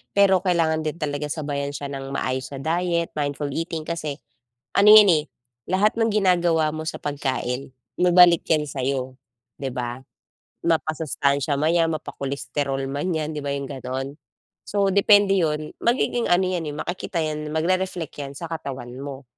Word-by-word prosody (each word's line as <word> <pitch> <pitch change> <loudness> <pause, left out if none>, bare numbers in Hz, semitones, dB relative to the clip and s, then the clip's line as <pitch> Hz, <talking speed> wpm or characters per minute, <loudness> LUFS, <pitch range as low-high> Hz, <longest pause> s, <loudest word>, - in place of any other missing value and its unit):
pero 195 -2 +5
kailangan 160 -3 +1
din 155 - -2
talaga 145 -1 -2
sabayan 145 -2 -3
siya 140 -1 -5
nang 135 0 -6
maayos 130 -1 -2
na 135 - -5
diet, 170 +2 0
mindful 145 0 -2
eating 165 +2 -3
kasi 155 -4 -3 0.6
ano 205 +1 +7
yan, 210 -2 +9
eh, 155 -3 +3 0.5
lahat 195 +4 +3
ng 225 0 +2
ginagawa 175 -6 +3
mo 155 - -4
sa - - -6
pagkain, 135 -2 -2 0.3
babalik 175 -1 +6
yan 155 -2 +3
sa'yo, 130 -1 -2 0.5
'di 135 - -2
ba? 125 0 -4 0.6
Mapasustansya 155 -3 0
man 155 +3 +2
'yan, 165 -1 +3
mapa-cholesterol 140 -2 -3
man 145 +7 -2
'yan, 155 -1 -2
'di 150 - -3
ba 140 - -1
'yong 140 -1 -4
gano'n. 135 +1 -5 0.5
So 200 -1 +1
depende 200 0 +5
yun. 155 -3 -1
Magiging 240 0 +1
ano 175 +1 +5
'yan, 180 -3 -2
eh, - - -8
makikita 175 +2 -4
'yan, 150 -1 -3
magre-reflect 180 0 -1
'yan 140 -1 -5
sa 170 - -6
katawan 135 -6 -6
mo, 140 0 -7
155 Hz, 160 wpm, -23 LUFS, 140-175 Hz, 0.6 s, yan